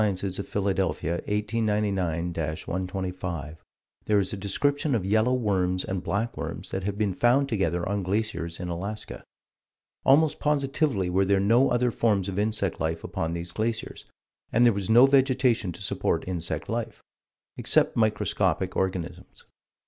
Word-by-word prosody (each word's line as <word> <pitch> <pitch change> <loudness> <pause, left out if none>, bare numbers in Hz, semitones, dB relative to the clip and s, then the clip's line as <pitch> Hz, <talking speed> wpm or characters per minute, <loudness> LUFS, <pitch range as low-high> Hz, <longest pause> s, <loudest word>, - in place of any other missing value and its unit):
of 100 -3 +1
Philadelphia_, 95 -2 -1 0.2
1899 105 -5 0
125, 85 -1 -4 0.4
there 105 -1 +3
is 95 0 -2
a - - -1
description 140 +8 0
of 100 -5 -1
yellow 110 +5 +3
worms 95 -6 0
and 95 -1 -3
black 110 +4 -2
worms - - -6
that 95 - -2
have 100 0 -2
been 105 -3 0
found 125 +7 +3
together 90 - -1
on 100 +1 -1
glaciers 95 -4 -2
in 90 - -4
Alaska. 95 +5 -5 0.8
Almost 150 +3 +4
positively 140 - +1
were 95 +2 +2
there 100 0 +3
no 115 +7 +4
other 120 0 +2
forms 105 -5 +1
of 100 0 -3
insect 105 -3 -1
life 80 +1 -2
upon 80 +1 -3
these 85 0 -5
glaciers, 110 +3 -3 0.5
and 120 +2 +4
there 120 - +5
was 100 +1 -3
no 120 +4 +8
vegetation 130 -6 +3
to - - -9
support - - -1
insect 85 -2 -3
life, 115 -1 -4 0.5
except - - +2
microscopic 110 -2 +1
organisms. 90 -1 -4
100 Hz, 145 wpm, -26 LUFS, 90-115 Hz, 0.8 s, no